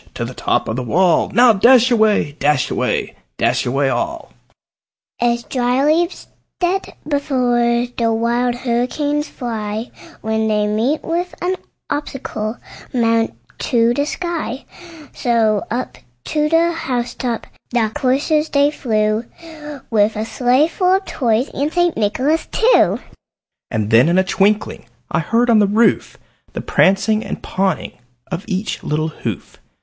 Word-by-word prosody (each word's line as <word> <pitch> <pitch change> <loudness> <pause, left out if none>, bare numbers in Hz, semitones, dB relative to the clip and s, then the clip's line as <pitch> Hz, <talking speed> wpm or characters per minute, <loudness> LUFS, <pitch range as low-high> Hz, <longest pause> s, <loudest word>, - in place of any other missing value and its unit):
to - - -3
the - - -7
top - - -1
of 110 - -2
the 130 - -2
wall! 170 +8 +2
Now 240 +2 +5
dash 245 +4 +5
away! 215 -9 +3
dash 145 -2 +1
away! - - -1 0.2
dash - - +1
away 135 +3 +1
all!" 335 - -3 0.9
As 235 0 +1
dry 250 +1 0
leaves 335 +4 +1 0.3
that 370 +2 -1
before 245 -5 +1
the 230 -1 +2
wild 240 +2 0
hurricane 255 +5 -1
fly, 225 -6 -5 0.3
When 220 0 0
they 210 -1 +1
meet 225 +9 0
with 350 +2 -2
an 360 +2 -1 0.4
obstacle, 245 -6 -4 0.3
mount 230 -2 +1 0.2
to 235 -2 +2
the 285 +3 -1
sky; 325 -8 -4 0.5
So 225 -4 +1
up 245 +3 -4 0.3
to 300 -1 +1
the 330 +1 +3
house 250 -7 -3
top 240 -3 -3 0.2
the 230 -3 0
coursers 295 +5 +1
they 285 +1 +3
flew, 215 -4 0 0.7
With 215 0 +3
the 215 +1 -2
sleigh 255 +6 +2
full 365 +2 +2
of 385 0 -2
Toys, 240 0 0
and 290 +2 -1
St. 350 -1 +1
Nicholas 260 +9 0
too. 470 +3 +3 0.7
And 110 -2 -2
then, 120 +8 +6
in 175 - +2
a 190 - +4
twinkling, 205 +2 0 0.2
I - - +1
heard 235 +1 +2
on 220 - +5
the 205 - +4
roof 220 +4 +2 0.4
The - - -4
prancing 215 +3 +2
and - - -6
pawing 190 -3 -1 0.4
of 180 +1 -4
each 200 0 -3
little 155 +1 -1
hoof. 155 - -6
235 Hz, 145 wpm, -18 LUFS, 215-285 Hz, 0.9 s, then